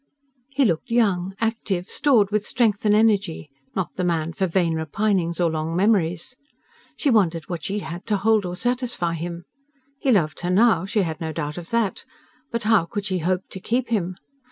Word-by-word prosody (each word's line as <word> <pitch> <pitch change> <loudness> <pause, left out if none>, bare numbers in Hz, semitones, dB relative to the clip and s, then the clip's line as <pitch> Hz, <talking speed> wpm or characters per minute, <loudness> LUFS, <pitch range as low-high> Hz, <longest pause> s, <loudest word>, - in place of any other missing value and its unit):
He 275 0 +2
looked 175 +5 0
young, 195 -6 +1
active, 220 -5 -1
stored 225 -9 +3
with 210 0 +1
strength 215 -3 +1
and 210 - +5
energy; 200 -8 +1 0.2
not 190 -3 -2
the 185 - 0
man 165 -2 0
for 190 +4 0
vain 170 -1 +1
repinings 170 +2 0
or 170 -2 +2
long 160 +1 -2
memories. 185 +1 +1 0.6
She 285 - +1
wondered 170 -8 +2
what 170 -3 -5
she 200 - -2
had 170 +2 -7
to 210 -2 +2
hold 215 +1 +3
or 180 -1 -4
satisfy 240 -6 -1
him. 170 +1 -5 0.5
He 270 - +2
loved 170 -9 +2
her 175 - -2
now; 190 -2 +4
she 205 0 +1
had 160 -2 -4
no 160 -1 -2
doubt 150 +2 -4
of 165 - -11
that; 230 -4 0 0.5
but 235 -2 -3
how 215 -5 +4
could 205 +2 -5
she 185 -2 0
hope 180 +3 0
to 190 - -6
keep 240 +6 -1
him? 185 -5 -1
190 Hz, 190 wpm, -23 LUFS, 170-220 Hz, 0.6 s, and